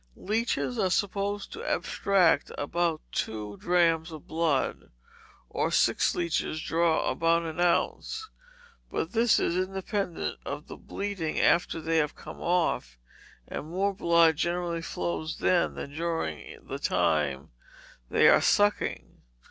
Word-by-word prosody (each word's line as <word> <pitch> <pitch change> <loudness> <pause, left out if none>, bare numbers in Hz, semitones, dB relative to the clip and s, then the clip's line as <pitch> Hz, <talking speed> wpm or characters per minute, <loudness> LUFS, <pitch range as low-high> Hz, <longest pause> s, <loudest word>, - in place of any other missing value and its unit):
Leeches 195 - -1
are 190 - +2
supposed 200 +1 -1
to 450 - -7
abstract 190 - +2
about 165 +2 -1
two 105 -2 -3
drachms 170 -2 +2
of 155 -2 -9
blood, 160 -4 -1 0.6
or - - -1
six - - +2
leeches 170 -2 -1
draw 165 +1 +1
about 165 0 +2
an 160 0 -5
ounce; 305 - 0 0.6
but 160 - -3
this 230 +1 +3
is 170 - 0
independent 190 0 -2
of 145 +2 -5
the - - -9
bleeding 195 -6 -4
after 170 -1 +3
they 165 +1 0
have 150 -1 -1
come - - -10
off, 165 - 0 0.5
and 150 - -6
more 195 +3 0
blood 170 -3 +4
generally 170 +1 -1
flows 85 - -3
then 75 -3 +2
than 140 - -7
during 165 - -3
the - - -5
time 70 -3 0 0.6
they - - +5
are - - +6
sucking. 205 0 +1
170 Hz, 130 wpm, -28 LUFS, 155-185 Hz, 0.6 s, are